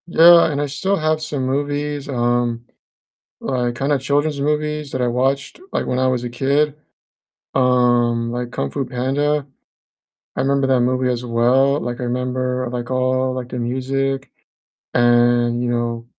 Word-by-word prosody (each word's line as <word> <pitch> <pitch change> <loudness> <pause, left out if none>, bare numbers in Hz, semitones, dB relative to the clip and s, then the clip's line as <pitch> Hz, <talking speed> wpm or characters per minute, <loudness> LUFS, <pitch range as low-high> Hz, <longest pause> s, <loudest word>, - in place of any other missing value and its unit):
Yeah, 170 -1 +7
and 145 0 -2
I - - 0
still 190 +8 -1
have 155 0 0
some 145 -4 -3
movies, 145 +1 -2
um, 120 -2 0 0.8
like, 125 -2 -1
kinda 140 +3 0
children's 145 +2 0
movies 150 0 -1
that 130 - -2
I 125 - +1
watched, 135 - -1
like, - - -1
when 125 - -1
I 130 - +2
was 125 -1 -1
a - - -2
kid, 140 +4 +1 0.8
um, 120 -2 +2
like 120 0 -4
Kung 70 - -3
Fu 135 - -2
Panda. 135 +4 -1 0.9
I - - -1
remember 140 0 +1
that 130 -2 +3
movie 125 +1 +1
as 125 -1 -2
well, 125 +4 +2
like, 120 0 -4
I - - -2
remember, 125 +1 -2
like, 120 0 -4
all, 130 0 +1
like, 125 -1 -5
the 125 - -5
music 135 +2 -2 0.6
and, 120 0 +3
you 125 - -1
know, 120 -1 -2
130 Hz, 160 wpm, -20 LUFS, 120-140 Hz, 0.9 s, Yeah